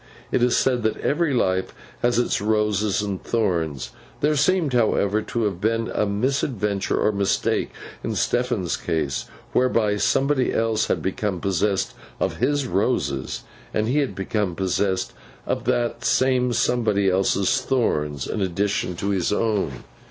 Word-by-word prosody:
It - - +2
is 125 0 +3
said 125 -2 +2
that 110 -1 0
every 165 +1 +1
life 95 -7 0 0.3
has 120 -1 +2
its 120 - +1
roses 105 -1 +1
and 100 -2 -4
thorns; 80 - -1 0.3
there 150 +1 +3
seemed, 155 0 +2
however, 110 -3 +2
to 115 +1 -2
have 95 -4 -2
been 115 +1 0
a 105 - +1
misadventure 105 -2 0
or 105 - +3
mistake 100 -1 0 0.3
in - - -2
Stephen's 120 -8 0
case, 75 -4 -2 0.3
whereby 115 -5 +2
somebody 135 +4 +2
else 115 -1 +1
had - - -1
become 95 0 -2
possessed 95 +2 0 0.3
of - - -1
his 145 +2 +1
roses, 90 - -1 0.3
and 110 0 +1
he 135 +5 +2
had 140 -3 -1
become 95 -2 -1
possessed 95 +1 0 0.3
of - - -2
the 120 -1 +1
same 130 -1 +2
somebody 110 -4 +1
else's 95 +6 +2
thorns 75 - 0
in 105 - -3
addition 95 0 -1
to 100 +4 -2
his 95 -3 0
own. 105 - 0
105 Hz, 145 wpm, -23 LUFS, 95-125 Hz, 0.3 s, is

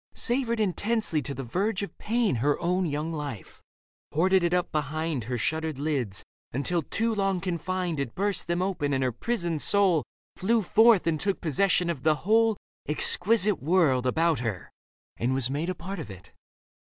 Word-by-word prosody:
Savoured 240 -2 +1
intensely 210 -3 +1
to 140 -1 -5
the 135 - -5
verge 190 - -1
of 200 - -7
pain 225 - +1
Her 145 +5 +1
own 180 +1 0
young 155 +2 -3
life, 145 - -7 0.5
hoarded 185 +4 +3
it 170 - +1
up 180 0 0
behind 155 -3 -2
Her 125 +1 -2
shuttered 160 +4 -1
lids, 135 -10 -1 0.3
until, 165 +7 0
too 225 +9 -1
long 195 -3 0
confined, 180 -1 -2
It 135 -5 -3
burst 200 +1 -1
them 175 +1 0
open 165 -7 -1
and 135 0 +1
her 130 - +1
prisoned 170 - -2
soul 190 -7 +3 0.3
Flew 225 +3 +2
forth 220 +1 +5
and 160 -2 0
took 195 +2 -1
possession 180 +2 +1
of 165 -6 -2
the 155 +1 +3
whole 225 0 +3 0.3
Exquisite 205 +6 +2
world 140 -5 +2
about 160 +2 +2
her 110 -8 -4 0.5
and 125 +3 0
was 135 -1 0
made 155 +5 -2
A 185 - -2
part 180 +4 -6
of 150 - -7
it. 95 -1 -12
170 Hz, 175 wpm, -27 LUFS, 145-195 Hz, 0.5 s, forth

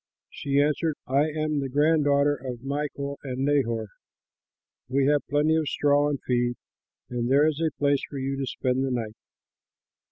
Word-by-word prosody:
She 140 0 -1
answered, 150 +2 +1
"I 140 +4 +2
am 155 -1 -1
the 135 -1 -3
grand 150 +3 +3
daughter 140 0 +3
of 125 -2 -7
Milcah 140 0 -3
and 130 -1 -3
Nahor. 115 -6 +1 1.0
We 135 +1 +2
have 145 0 +3
plenty 150 +2 +2
of 160 -2 0
straw 145 0 +2
and 145 -2 -2
feed, 120 -1 +1 0.6
and 120 -1 -1
there 140 +3 +5
is 155 0 0
a 160 - +2
place 140 -1 +2
for 140 - -7
you 135 +1 -2
to 135 -1 -3
spend 130 +1 -1
the 135 - -1
night." 115 -4 -3
140 Hz, 170 wpm, -26 LUFS, 130-145 Hz, 1.0 s, there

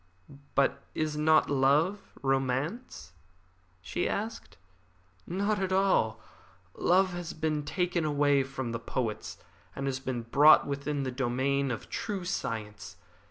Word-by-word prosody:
"But 140 - +2
is 155 -1 -1
not 155 +1 +4
love 145 +8 +2 0.2
romance?" 135 - -2 0.7
she 175 - -2
asked. 220 +2 -4 0.7
"Not 200 +3 0
at 190 -1 -1
all. 185 - +2 0.5
Love 185 +1 +3
has 175 -1 -5
been 155 -1 -1
taken 180 +2 -1
away 145 -2 +3
from 130 -2 -4
the 115 - -3
poets, 115 -2 -4 0.4
and 135 - -4
has 135 -1 -1
been 130 -3 -4
brought 145 +6 +6
within 140 0 -2
the 130 - -2
domain 135 +2 0
of 120 - -4
true 195 -4 -4
science. 105 - -4
140 Hz, 125 wpm, -29 LUFS, 130-175 Hz, 0.7 s, brought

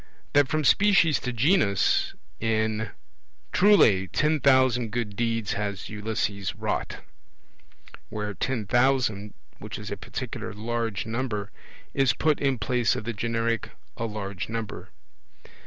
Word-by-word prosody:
That 145 -1 +5
from 155 +2 0
species 195 -3 +4
to 125 - -3
genus 120 - +2 0.2
in 110 -1 0 0.6
'Truly 115 - +5
ten 150 - +1
thousand 130 -3 +4
good 105 -3 -3
deeds 115 -1 -1
has 100 -2 -4
Ulysses 105 -2 -2
wrought', - - -3 1.1
where 105 -1 -4
'ten 120 0 -2
thousand', 120 -4 +1 0.2
which - - -7
is - - -7
a - - -3
particular 115 -3 -6
large 115 0 -2
number, 110 -3 -3 0.4
is 135 -4 +3
put 155 -2 +1
in 135 -2 +1
place 120 +2 +1
of - - -4
the 115 +2 -3
generic 115 +1 -1 0.3
'a 115 - -3
large 100 -3 -5
number'. 115 -2 -5
115 Hz, 125 wpm, -26 LUFS, 105-130 Hz, 1.1 s, That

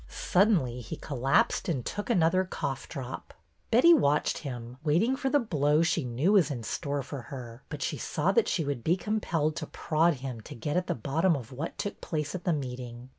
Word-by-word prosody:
Suddenly 175 - +2
he 115 - -6
collapsed 135 +3 +1
and 135 -8 -1
took 205 +3 -4
another 185 -3 +3
cough 140 -7 -4
drop. 130 -4 -7 0.3
Betty 255 +10 +7
watched 150 - +2
him, 125 -3 -7
waiting 175 - +2
for 270 0 -1
the 290 - +4
blow 150 - +2
she 165 -1 +1
knew 125 +10 +1
was 195 -6 +5
in 125 -5 -4
store 140 +5 -2
for 140 0 -6
her, 120 -2 -9
but - - -4
she - - -2
saw - - 0
that 465 - +3
she 160 - 0
would 140 -5 -3
be 170 +3 +2
compelled 170 -7 -1
to - - -4
prod 165 +1 +1
him 125 -3 -6
to - - -10
get 145 +6 -3
at 180 0 0
the - - 0
bottom 155 - +1
of 125 -4 -7
what 145 +6 -5
took 205 - -4
place 150 -2 -3
at 185 - -6
the 180 - +3
meeting. 125 -3 -5
150 Hz, 205 wpm, -29 LUFS, 130-180 Hz, 0.3 s, Betty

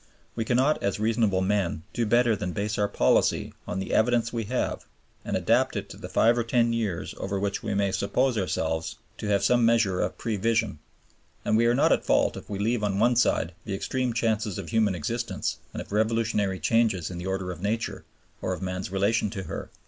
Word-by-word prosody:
We 115 - -2
cannot 130 +6 +2
as 100 +1 -1
reasonable 110 -3 +2
men 95 -5 0
do 115 -2 0
better 120 0 +4
than 90 -3 -4
base 105 +2 -2
our 105 - +3
policy - - +2
on 90 - -3
the 95 - -3
evidence 115 +1 +2
we 115 -2 -2
have 125 +4 -2 0.4
and - - -1
adapt - - +2
it - - -4
to - - -10
the - - -8
five 115 +1 +4
or - - +1
ten 115 0 +2
years 105 -7 -2
over 95 +1 -2
which 100 0 -2
we - - -2
may 100 -1 +1
suppose 125 +7 +1
ourselves 80 -5 -1 0.2
to - - -4
have 100 -1 +2
some 120 +4 +4
measure 115 -5 +3
of 90 - -2
prevision; 115 -5 0 0.7
and - - +2
we 115 +1 +4
are 120 - +3
not 135 - +3
at - - +3
fault - - +2
if - - -10
we 100 - -3
leave 110 +2 0
on 100 -2 0
one 120 +4 +3
side 90 -7 +2
the 100 -3 -3
extreme 130 +5 -1
chances 110 -3 0
of - - -6
human 110 -4 +2
existence 115 +9 -2
and - - -5
of - - -20
revolutionary 110 -3 +1
changes 100 -1 +1
in 90 - -6
the 90 - -5
order 95 -1 -2
of 85 -1 -8
Nature 110 +3 -2 0.4
or 95 - -1
of 90 - -6
man's 90 0 -3
relations 100 +2 +1
to 95 - -3
her. 80 - -6
105 Hz, 210 wpm, -26 LUFS, 95-115 Hz, 0.7 s, better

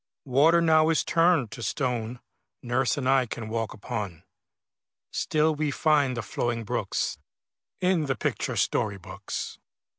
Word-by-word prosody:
Water 150 +6 +4
now 160 -1 +5
is 165 - +2
turned 165 -8 +3
to 115 - -8
stone 120 -1 -2 0.4
Nurse 125 +1 +1
and 130 -3 -2
I 130 -1 +4
can 110 -1 -6
walk 115 -1 -2
upon; 100 -5 -5 0.9
Still 155 +1 +1
we 150 0 -1
find 145 -4 +2
the 115 - -2
flowing 115 +2 -2
brooks 115 -3 -2 0.6
In 180 -4 +2
the 135 - 0
picture - - -2
story 100 -2 0
books. 90 - -6
130 Hz, 140 wpm, -27 LUFS, 115-155 Hz, 0.9 s, now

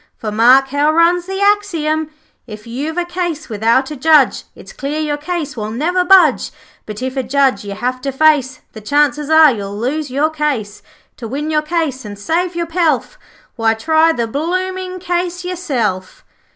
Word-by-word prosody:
For 215 - -5
mark 250 +5 +5
how 290 +2 +2
runs 340 +2 +2
the 385 +1 -4
axiom 330 -7 0 0.4
'If 215 -2 -10
you've 280 +8 -5
a 355 - 0
case 345 -4 -4
without 230 +6 +1
a - - -5
Judge, 300 0 +3
It's - - -13
clear 290 +3 -4
your 300 -1 -1
case 305 -1 -4
will 215 -2 -4
never 330 +11 0
budge; 380 0 +4 0.4
But 215 +3 -7
if 260 +1 -3
a 265 - 0
Judge 260 -4 +1
you 200 -1 -6
have 255 +3 -3
to 275 - -3
face, 275 -2 +2
The 220 - -10
chances 290 +4 +1
are 315 -2 +7
you'll 200 -3 -5
lose 280 +6 -2
your 290 +5 0
case. 275 -10 -3 0.4
To 235 - -7
win 290 +6 -4
your 305 -1 +2
case, 305 -5 -2
and 205 -2 -8
save 340 - -1
your 340 0 -1
pelf, 330 - -1 0.4
Why, 225 -1 +2
try 315 +7 +3
the 235 -7 -1
blooming 370 +8 -3
case 355 0 -3
yourself!' 255 - -3
295 Hz, 180 wpm, -16 LUFS, 250-340 Hz, 0.4 s, are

